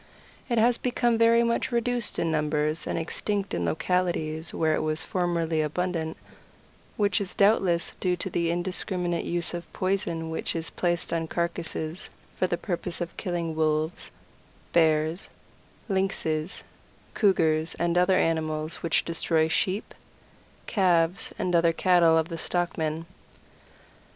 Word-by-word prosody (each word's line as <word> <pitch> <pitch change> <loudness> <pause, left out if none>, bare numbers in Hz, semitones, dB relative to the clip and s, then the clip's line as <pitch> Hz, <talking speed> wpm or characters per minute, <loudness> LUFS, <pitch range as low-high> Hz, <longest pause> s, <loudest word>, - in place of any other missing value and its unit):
It 235 - +1
has 235 +2 +4
become 240 -1 +1
very 230 +1 +5
much 235 +2 0
reduced 240 -1 0
in 165 - 0
numbers 150 0 0
and - - -1
extinct 200 +4 -2
in - - -1
localities 165 -2 -1
where 160 -1 +1
it - - +1
was 155 0 -1
formerly 170 -3 0
abundant, 160 +1 -2 0.8
which 205 -2 +2
is 195 - -3
doubtless 195 -5 +3
due 180 -1 +1
to 175 - -3
the 170 -1 0
indiscriminate 175 0 -1
use 175 0 -1
of 175 -1 -6
poison 180 -4 -1
which 160 - -2
is 165 0 -3
placed 175 -1 0
on 165 -1 -1
carcasses 170 0 -3 0.3
for 185 - +1
the 175 - -1
purpose 175 -2 -3
of 175 -1 -4
killing 170 -4 -3
Wolves, 155 +1 0 0.6
Bears, 160 +1 +2 0.6
Lynxes, 190 -5 -1 0.5
Cougars, 165 -6 +2
and 170 0 0
other 180 +1 +4
animals 155 -1 0
which 165 - +1
destroy 165 -1 +1
Sheep, 185 +5 -1 0.7
Calves, 180 -3 +2
and 180 - -1
other 170 -1 +4
cattle 170 -2 +4
of 160 0 +1
the 165 -2 -5
stockmen. 165 -2 -1
170 Hz, 135 wpm, -27 LUFS, 160-185 Hz, 0.8 s, very